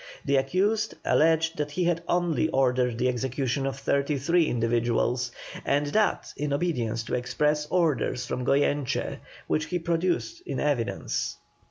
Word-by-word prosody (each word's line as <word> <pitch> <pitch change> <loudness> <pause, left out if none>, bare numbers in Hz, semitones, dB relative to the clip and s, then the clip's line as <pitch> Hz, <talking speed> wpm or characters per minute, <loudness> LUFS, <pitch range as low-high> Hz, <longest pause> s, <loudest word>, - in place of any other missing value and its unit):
The 140 0 +3
accused 200 +11 +1
alleged 160 +1 +3
that 150 -1 -1
he 170 +5 -1
had 170 -1 +1
only 175 -3 +1
ordered 125 -4 +2
the 125 - +1
execution 130 +2 -1
of 135 0 -3
thirty 140 +1 0
three 165 +4 +2
individuals, 120 +1 0 0.3
and 145 +1 +1
that 215 -1 +1
in 145 0 -2
obedience 120 -8 -1
to 115 - -6
express 150 +4 0
orders 150 -7 +1
from 125 +1 -3
Goyeneche, 140 +1 0 0.3
which 155 - 0
he 180 +3 -2
produced 175 - -1
in - - -3
evidence. 140 -6 -1
145 Hz, 145 wpm, -27 LUFS, 125-165 Hz, 0.3 s, The